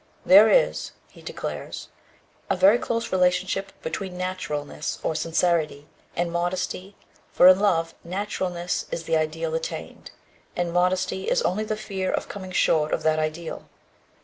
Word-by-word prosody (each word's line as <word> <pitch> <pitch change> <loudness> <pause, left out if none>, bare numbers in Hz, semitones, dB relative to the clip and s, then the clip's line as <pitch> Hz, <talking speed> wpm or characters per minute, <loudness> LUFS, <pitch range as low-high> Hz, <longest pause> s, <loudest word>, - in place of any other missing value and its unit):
"There 205 +4 +8
is," - - +2 0.2
he - - -16
declares, - - -6 0.6
"a 195 - +2
very 195 +6 +5
close 230 -1 -2
relationship 185 +1 +1
between 190 -3 -4
naturalness, 180 -6 -4
or - - 0
sincerity, 160 -2 0 0.3
and 170 0 -1
modesty, 180 +3 -3 0.4
for 180 - +6
in 185 0 +6
love, 165 -5 +1
naturalness 180 -1 -3
is 165 - -4
the 165 0 0
ideal 160 +1 -1
attained, 160 0 -5 0.5
and 175 -1 -1
modesty 185 +1 +1
is - - +2
only 210 +4 0
the 215 0 -2
fear 190 -3 -3
of - - -2
coming 190 -2 -8
short 155 -4 +2
of - - -7
that 155 0 +2
ideal. 155 +1 -4
180 Hz, 145 wpm, -25 LUFS, 165-190 Hz, 0.6 s, There